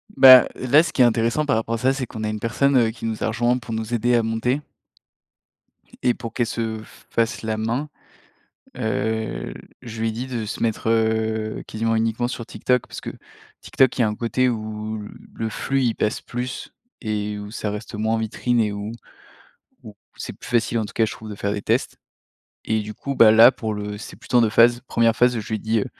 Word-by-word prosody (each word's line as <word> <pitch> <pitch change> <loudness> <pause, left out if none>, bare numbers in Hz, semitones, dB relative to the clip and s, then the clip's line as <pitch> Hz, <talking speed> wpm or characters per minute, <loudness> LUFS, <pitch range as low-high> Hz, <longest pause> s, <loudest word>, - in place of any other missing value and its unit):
Bah, 130 -2 +9
là, 140 +6 +4
ce - - -4
qui - - +2
est 125 - +8
intéressant 115 +5 +1
par 135 -6 +2
rapport 115 +1 -1
à - - -2
ça, 130 +4 +2
c'est 135 -2 -3
qu'on 110 -1 -7
a 110 - -1
une 110 0 -3
personne, 135 +5 +2
heu, 115 -2 +4
qui 115 - -9
nous 110 -1 -3
a - - +1
rejoint 120 +2 +1
pour 120 -2 -7
nous 110 +1 -4
aider 120 +1 +2
à 115 - +3
monter 115 +5 0 1.4
et 125 - +3
pour 115 -1 -8
qu'elle 120 - 0
se 115 -2 -3
f - - -18
fasse 115 0 0
la 110 -1 -2
main, 115 +7 -2 0.9
heu, 110 -1 -2
l - - -10 0.2
je 115 -1 -7
lui 115 - +1
ai - - -2
dit 120 +4 -5
de 120 -4 -3
se 105 - -6
mettre, 110 0 -1
heu, 110 -1 0
quasiment 115 +1 -1
uniquement 115 +2 0
sur 115 -2 -5
TikTok 125 0 0
parce - - -8
que - - -5 0.5
TikTok, 130 0 +2
il - - +2
y - - +5
a 110 - +3
un 105 - -2
côté 125 +3 +1
où, 110 -1 -4 0.3
le 110 -1 -2
flux 135 +5 -1
il 115 -2 +1
passe 105 - -1
plus 125 +1 -6 0.3
et 105 -2 -2
où 105 0 -8
ça 105 -2 -3
reste 105 +1 -7
moins 110 +1 0
vitrine 120 +2 0
et 105 -2 +1
où 105 +1 -5 0.9
où - - -11 0.2
c'est - - -6
plus - - -12
facile, 120 -1 +1
en 110 - 0
tout - - -11
cas 115 - +2
je - - -5
trouve, 110 -1 -9
de - - -5
faire 100 0 -2
des 100 - -4
tests - - 0 0.7
et 110 -1 +1
du 105 +1 -7
coup, 140 +5 -5
bah, 110 -3 +7
là 115 +3 +8
pour 110 -4 -4
le 105 0 -5
c'est - - -9
plutôt 125 - 0
en - - +6
2 115 - +3
phases. 120 +2 +5
1ère 115 -1 +2
phase 125 0 +3
où - - -2
je 105 - -10
lui 110 - -1
dis, 110 0 0
heu: - - -1
115 Hz, 235 wpm, -22 LUFS, 110-120 Hz, 1.4 s, Bah